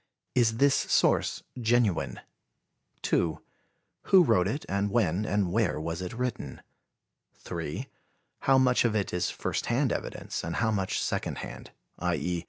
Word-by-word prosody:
Is 115 -2 +3
this 140 +2 +5
source - - +2 0.2
genuine? 115 -4 +1 0.8
2. 80 -2 +1 0.7
Who 190 -2 +7
wrote 90 - +3
it 140 +9 -3
and 100 +1 0
when 100 -3 +1
and 100 -3 +1
where 95 -8 +1
was 80 +2 -4
it 90 - -5
written? 125 0 -4 0.7
3. - - -5 0.5
How 135 0 +4
much 125 -1 +4
of 115 -3 +1
it 100 -4 -1
is 90 0 0
first - - -3
hand - - +1
evidence - - -4
and 85 0 -3
how 110 -1 +1
much 95 -3 -1
second - - -2
hand, - - -10 0.3
i. 90 -1 0
e. 90 0 -2
105 Hz, 150 wpm, -28 LUFS, 90-120 Hz, 0.8 s, Who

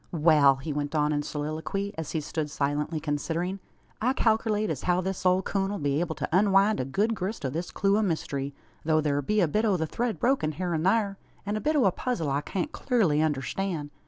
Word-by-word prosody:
"Wal!" 150 -4 +5
he 140 +3 -5
went 145 +1 -3
on 150 0 +2
in 145 - 0
soliloquy, 155 +7 -3
as 160 -2 -5
he 160 - 0
stood 150 0 -3
silently 145 +2 -1
considering, 160 +5 -2 0.4
"I 250 +4 +2
kalkerlate 220 -4 +1
as 145 - -4
how 180 0 +2
this 185 0 -1
ole 185 +1 +3
coon 195 0 -1
'll 205 - -2
be 145 -2 0
able 165 -2 -2
to - - -3
unwind 200 +2 +4
a 130 - -1
good 205 - 0
grist 195 -4 -4
o' 130 - -1
this 170 +5 -3
clue 200 +1 +2
o' - - +2
mystery, 145 -7 -2 0.3
tho' 155 0 +3
thur 145 -2 +1
be 210 +9 +1
a 175 - +3
bit 210 +8 0
o' 205 -4 +2
the 160 - -1
thread 235 +7 -2
broken 240 - +1
hyur 175 +3 -2
an 160 +1 -1
thur, 200 -1 +2 0.3
an 205 +1 -1
a 215 - -2
bit 310 +1 +1
o' 280 - +4
a 190 - +5
puzzle 175 - -2
I 140 +1 0
can't 195 - -3
clurly 195 - +1
understan'. 155 +2 -2
170 Hz, 225 wpm, -27 LUFS, 150-200 Hz, 0.4 s, Wal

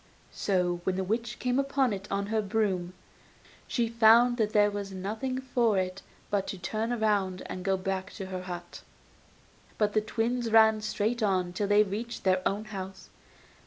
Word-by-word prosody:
So 180 -3 0
when 185 - 0
the 190 - -1
witch 230 +4 -2
came 250 +1 0
up 275 0 -2
to 265 -4 +3
it 200 0 -5
on 200 0 -1
her 220 - +2
broom 190 -4 -1 0.7
she 235 -2 0
found 230 +2 +5
that 215 -3 +1
there 205 -1 +4
was 200 -1 -5
nothing 220 +8 -3
for 240 -5 +1
it 185 0 -2 0.3
but 200 -2 0
to 195 - -4
turn 215 +5 -2
round 200 -4 +1
and 185 - -6
go 195 0 +1
back 190 0 -3
to 195 - -6
her 185 -1 -5
hut. 175 -1 -7 1.0
But 210 -1 +1
the 215 - +3
twins 230 +2 -1
ran 220 -1 +6
straight 215 +3 -1
on 185 -4 +1
till 200 +2 -1
they 205 +1 +5
reached 220 +4 -5
their 185 -1 +3
own 205 +2 -2
home. 195 -3 -6
205 Hz, 180 wpm, -29 LUFS, 190-225 Hz, 1.0 s, ran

